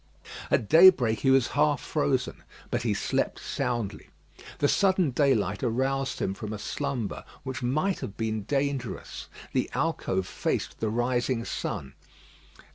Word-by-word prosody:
At 110 - +2
daybreak 155 - +7
he 135 - +2
was 130 -2 +4
half 145 -2 +2
frozen; 70 - -1 0.3
but - - 0
he - - 0
slept - - -1
soundly. 120 -5 -3 0.5
The 145 - +2
sudden 190 -3 +3
daylight 120 -8 +1
aroused 135 +3 0
him 95 - -1
from 105 +2 -6
a - - -4
slumber 130 -1 -3 0.2
which 130 +1 -5
might 155 +10 0
have 100 - -6
been 110 -1 -1
dangerous. 135 -1 -3 0.3
The - - 0
alcove 95 0 0
faced - - -2
the 110 - 0
rising 120 +1 0
sun. 65 0 -4
125 Hz, 135 wpm, -27 LUFS, 110-140 Hz, 0.5 s, daybreak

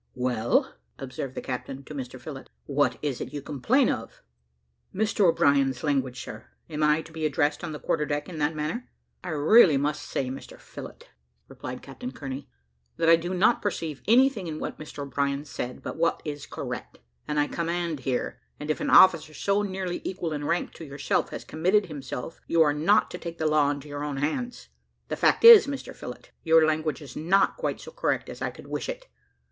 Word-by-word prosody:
"Well," 125 -3 +1 0.2
observed 130 0 -6
the - - -5
captain 130 +1 -5
to 150 - -10
Mr 130 -2 -6
Phillott, 135 +1 -8 0.2
"what 140 -3 +1
is 140 -4 -2
it - - -5
you 145 - -4
complain 150 - +2
of?" - - -4 0.7
"Mr 205 0 +1
O'Brien's 140 -4 +2
language, 135 -4 0
sir. 110 +2 -9 0.2
Am 155 0 -3
I 150 +1 +3
to - - -14
be 160 -1 -5
addressed 150 0 +1
on 170 - -4
the 150 - -5
quarter 150 -2 0
deck 145 0 -2
in 165 -4 -7
that 150 +2 +1
manner?" 155 +12 -3 0.3
"I 180 - -5
really 155 +2 +6
must 145 +2 -1
say, 130 -2 -3
Mr 135 - -9
Phillott," 480 - -11 0.4
replied - - -8
Captain 250 0 -7
Kearney, 135 - -7 0.5
"that 165 - +3
I 165 - +9
do 170 +2 -4
not 210 +6 +3
perceive 165 -7 -3
anything 240 -4 +4
in 155 -1 -4
what - - -5
Mr 150 -1 -7
O'Brien 140 +1 -1
said, 125 -3 -6
but - - -5
what 165 +1 +1
is 145 -2 -5
correct. - - -6 0.3
I 150 -1 +1
command 170 -1 -2
here; 125 -2 -2 0.2
and 150 +1 -2
if - - -3
an - - -1
officer 165 -4 +6
so 200 +7 +1
nearly 190 -3 -3
equal 170 -4 -3
in 145 -1 -3
rank 170 +3 -1
to - - -10
yourself 140 -2 -1
has - - -6
committed 185 +6 +2
himself, 140 -1 -7
you 165 -1 +5
are 145 -2 +2
not 165 +8 +3
to - - -6
take 170 -1 -7
the 160 - -2
law 150 -2 +3
into 145 0 -4
your 145 0 -5
own 145 -2 -3
hands. 240 - -3 0.4
The - - -1
fact - - +2
is, 460 -8 +11
Mr 280 -1 -5
Phillott, - - -9
your 160 -1 +6
language 155 -1 -1
is 135 -3 -11
not 185 +6 +3
quite - - -2
so 480 - -10
correct - - -1
as - - -9
I - - 0
could - - -12
wish - - -4
it. - - -6
155 Hz, 200 wpm, -27 LUFS, 140-175 Hz, 0.7 s, is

